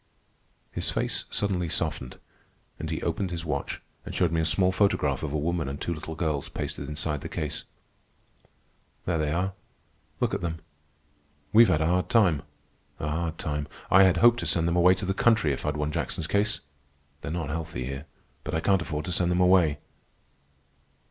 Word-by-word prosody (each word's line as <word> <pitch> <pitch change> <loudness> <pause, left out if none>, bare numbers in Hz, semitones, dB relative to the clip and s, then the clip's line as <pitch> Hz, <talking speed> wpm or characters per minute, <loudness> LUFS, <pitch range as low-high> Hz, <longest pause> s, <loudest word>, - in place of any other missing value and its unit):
His - - -2
face - - -1
suddenly 90 -4 -1
softened, 80 -6 -2 0.6
and 80 - -4
he 80 - -3
opened 90 +3 -1
his 85 -1 -4
watch 70 -3 -3 0.2
and - - -7
showed 85 -3 +2
me 80 -1 +1
a - - 0
small 90 +3 +3
photograph 95 -8 +2
of 80 - -3
a 75 - 0
woman 80 -1 -1
and 70 +1 -5
two 85 - -2
little 80 0 -6
girls 80 -4 -1
pasted - - -4
inside 75 -1 -2
the - - -6
case. 75 -2 -4 1.4
"There 85 -2 0
they 75 -1 0
are. 90 +4 0 0.7
Look - - +1
at - - -1
them. 85 -1 -2 1.0
We've 115 +1 +8
had 75 - +2
a - - +2
hard 90 +2 +1
time, 100 -11 +4 0.6
a 75 - -2
hard 80 +1 -2
time. 75 -1 -3 0.2
I 95 - +8
had 95 -2 +5
hoped 120 +5 +6
to - - -2
send 85 -1 +2
them 85 - +1
away 90 +1 +6
to 95 - -5
the 95 - 0
country 110 -8 +3
if 70 - -4
I'd 75 0 0
won 75 0 -1
Jackson's - - -2
case. 105 +2 +1 0.6
They're - - -5
not 80 -2 -3
healthy 80 -6 -4
here, 70 +4 -6 0.4
but - - -3
I - - +2
can't 95 +2 +3
afford 75 -2 -3
to 90 - -3
send 85 0 +1
them 90 0 +2
away." 90 -5 +5
80 Hz, 190 wpm, -27 LUFS, 75-90 Hz, 1.4 s, We've